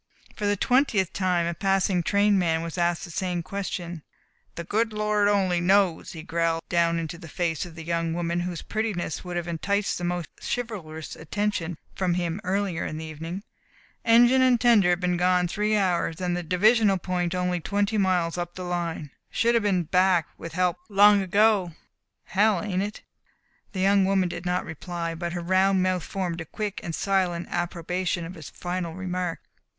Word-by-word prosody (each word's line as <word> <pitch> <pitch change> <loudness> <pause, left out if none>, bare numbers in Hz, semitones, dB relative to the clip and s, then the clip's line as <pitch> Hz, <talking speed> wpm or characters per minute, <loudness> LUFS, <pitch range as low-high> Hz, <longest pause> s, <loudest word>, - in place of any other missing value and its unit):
For 210 - -2
the 205 0 +1
twentieth 215 - +2
time 180 -3 +1
a 170 - -1
passing 195 0 +1
train 200 +2 +3
man 165 -2 +1
was 165 -1 -5
asked 175 -1 0
the 170 - -10
same 175 0 -2
question. 175 -2 -5 0.5
"The 170 - -5
good 220 +5 0
Lord 210 -1 +1
only 190 -4 +2
knows," 190 -2 +2
he 160 -2 -8
growled 165 0 0
down 170 -1 +2
into 165 +1 -4
the 170 - -10
face 170 +1 -2
of 165 - -13
the 165 - -8
young 165 0 -1
woman 170 0 -1
whose 175 -1 -4
prettiness 215 -8 -3
would 180 -1 -4
have 175 0 -3
enticed 195 +5 -1
the - - -5
most 175 -1 -2
chivalrous 180 -10 -5
attention 175 -1 -2 0.2
from 180 -2 0
him 175 +2 -2
earlier 195 -2 -1
in 155 - -4
the 160 - -5
evening. 165 +5 -6 0.6
"Engine 240 +3 +6
and 255 -2 +4
tender 215 -7 +5
been 180 0 -1
gone 180 0 +3
three 210 +4 0
hours 175 -3 0
and 180 -1 -1
the 175 - -2
divisional 200 +4 +3
point 180 -1 -2
only 180 -1 0
twenty 205 +4 0
miles 180 -3 +1
up 175 0 -4
the 185 - -6
line. 170 -4 -3 0.2
Should 235 +1 +2
have 230 - +3
been 195 -4 +1
back 180 0 +2
with 165 0 -8
help 180 -1 +1
long 205 0 +6
ago. 195 -2 +3 0.5
Hell, 205 -1 +2
ain't 190 -3 -1
it?" 205 +1 -5 0.7
The 185 - -2
young 195 0 +4
woman 190 -2 +2
did 175 +1 -6
not 180 +1 0
reply, 170 +1 -4
but 170 +1 -4
her 175 - -3
round 190 +2 +3
mouth 185 -1 +1
formed 175 -3 -3
a - - -6
quick 210 +4 -4
and 165 - -3
silent 185 -3 0
approbation 175 0 -2
of 180 - -7
his 160 -5 -10
final 175 -2 -4
remark. 180 -2 -3
180 Hz, 185 wpm, -26 LUFS, 170-200 Hz, 0.7 s, Engine